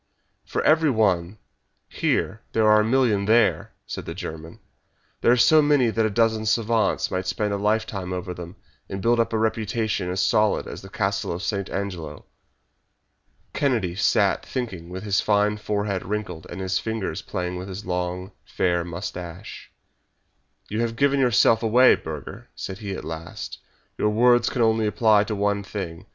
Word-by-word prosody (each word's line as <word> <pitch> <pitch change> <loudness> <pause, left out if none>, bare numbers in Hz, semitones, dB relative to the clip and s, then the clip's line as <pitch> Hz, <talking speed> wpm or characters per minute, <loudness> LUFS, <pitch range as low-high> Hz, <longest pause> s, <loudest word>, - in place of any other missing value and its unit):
"For - - -2
every 155 0 +4
one 100 -5 +1 0.5
here 105 +3 -1
there 110 -1 +3
are 105 0 +6
a - - +1
million 110 -4 +2
there!" 110 +1 +2
said - - -6
the 85 - -6
German. 80 -3 -8 0.6
"There - - +4
are 125 - +4
so 155 +6 +6
many 145 -5 +3
that 110 0 +1
a - - -2
dozen 110 0 +1
savants 115 0 +1
might 95 0 -2
spend 100 +3 -1
a - - 0
lifetime 105 -2 -1
over 90 0 -4
them, 85 0 -9 0.3
and 95 - -4
build 115 +4 +2
up 115 - +1
a 110 - 0
reputation 110 -3 -1
as 90 +1 -2
solid 105 0 +2
as - - -8
the 95 - -11
Castle 100 0 -1
of 85 +3 -4
St. 100 -2 -2
Angelo." 85 -7 -5 1.3
Kennedy 120 - 0
sat 100 +1 +2
thinking 105 -10 -5
with 95 +2 -6
his 100 -2 +1
fine 105 0 +2
forehead 105 -2 -2
wrinkled 105 -5 -4
and 85 - -7
his 95 0 0
fingers 110 -3 -3
playing 90 0 -4
with 90 +1 -6
his 100 +3 -7
long, 90 +1 -3
fair 85 -1 0
moustache. 90 +2 -7 1.0
"You 110 +2 -2
have 115 -1 -1
given 140 +2 +2
yourself 115 -3 +4
away, 120 +3 +6
Burger!" 75 -3 -7
said 95 +1 -6
he 100 -3 -5
at - - -7
last. 80 0 -7 0.4
"Your 105 - +2
words 120 +3 +4
can 120 - 0
only 110 -1 +2
apply 105 -1 +3
to 105 - -3
one 100 0 0
thing. 95 -3 -6
105 Hz, 170 wpm, -24 LUFS, 90-110 Hz, 1.3 s, are